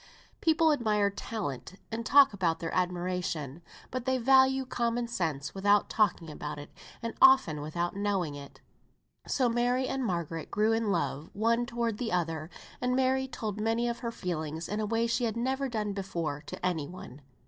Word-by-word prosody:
People 320 0 +4
admire 210 -7 +2
talent, 190 - -5 0.2
and 225 +1 -3
talk 275 +1 +6
about 170 -4 0
their 165 - -4
admiration. 180 -4 -2 0.3
But 255 -1 -3
they 260 -1 +2
value 265 +1 +4
common 240 -1 -1
sense 160 -11 -2
without 205 +1 +3
talking 180 -7 +1
about 150 0 -6
it, 145 0 -9 0.3
and 230 - -3
often 265 - +6
without 170 +4 -2
knowing 200 -6 0
it. 140 -1 -11 0.7
So 255 -3 +2
Mary 245 +2 +1
and 270 -1 -2
Margaret 170 -6 -3
grew 215 +2 +2
in 225 -1 0
love 165 -4 -1
one 230 +3 +1
toward 235 -3 -2
the 230 -3 -2
other; 165 -3 -1 0.3
and 250 0 +1
Mary 265 0 +2
told 215 -5 -4
many 225 +2 +1
of 235 0 -2
her 235 - -3
feelings 160 -5 -4
in 210 - -2
a 215 - -1
way 230 +2 +1
she 235 +1 0
had 225 0 -2
never 265 +3 -1
done 210 -3 -2
before 170 -7 -3
to - - -5
any 160 -5 0
one. 150 -6 -10
210 Hz, 175 wpm, -30 LUFS, 170-240 Hz, 0.7 s, talk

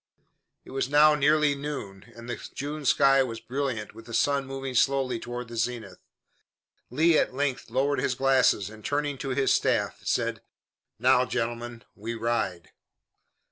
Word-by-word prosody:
It - - -12
was 135 -1 -2
now 150 +1 +6
nearly 150 0 +3
noon, 135 -8 -7
and 115 0 -11
the 120 - -4 0.2
June 145 +2 -5
sky 135 +1 +5
was 115 -3 -3
brilliant 125 -5 -3
with 115 +2 -13
the 115 - -4
sun 140 -1 +1
moving 135 -1 -5
slowly 130 -1 +2
toward 120 +1 -6
the 120 - -9
zenith. 115 -4 -3 0.9
Lee 160 +5 +4
at - - -1
length 135 -3 -2
lowered 135 +4 +1
his 130 - 0
glasses 130 -6 +2
and, 110 -1 -13
turning 145 0 -2
to 135 - -4
his 135 +1 +2
staff, - - 0
said: - - -1 0.6
"Now, 125 +2 +4
gentlemen, 120 -1 -4
we 115 +3 -6
ride." 115 -7 -2
130 Hz, 155 wpm, -27 LUFS, 115-140 Hz, 0.9 s, now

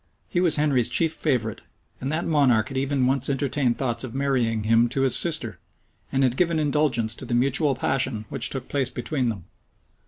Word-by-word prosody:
He 175 - 0
was 170 -4 +4
Henry's 140 -6 +2
chief 160 +6 +2
favorite; 120 -10 -2 0.4
and 135 +2 -4
that 160 +2 -2
monarch 130 -9 +2
had 135 - -5
even 135 -1 0
once 135 +1 0
entertained 135 -2 0
thoughts 120 -3 -2
of 130 -2 -7
marrying 125 -6 0
him 115 +2 +3
to 135 - -2
his 135 -2 +4
sister, 125 - +1 0.5
and 135 0 +1
had 130 -1 0
given 170 -2 +1
indulgence 145 -7 +1
to - - -6
the 120 - -2
mutual 140 +3 +1
passion 130 -3 -1
which 135 -4 +2
took 135 - -5
place 135 -3 0
between 125 0 -2
them. 100 -6 -6
130 Hz, 190 wpm, -24 LUFS, 120-145 Hz, 0.5 s, was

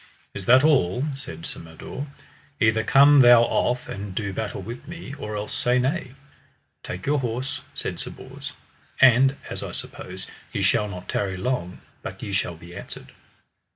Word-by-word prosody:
Is 95 - -7
that 130 +3 +7
all? 130 - +3
said 85 -12 -8
Sir - - -5
Mador, 80 - -7 0.5
either 110 -1 +3
come 140 +5 +7
thou 120 -2 +8
off 125 +1 0
and 100 -1 -6
do 100 -2 -2
battle 105 +1 -3
with 120 +5 -8
me, 170 -4 -8
or 105 -7 -5
else 105 0 -4
say 125 +1 +2
nay. 130 +1 -1 0.7
Take 90 +2 -6
your 145 +1 +2
horse, 125 +1 -2
said - - -4
Sir - - -5
Bors, - - -8 0.5
and 135 +1 +6
as - - -4
I - - -5
suppose, 95 +1 -5 0.3
ye 100 - -1
shall 105 +2 +3
not 90 -3 -8
tarry 95 -2 -1
long 90 -4 -2 0.2
but - - -7
ye 100 - -4
shall 95 -3 0
be 85 +1 -12
answered. - - -9
115 Hz, 170 wpm, -25 LUFS, 95-130 Hz, 0.7 s, thou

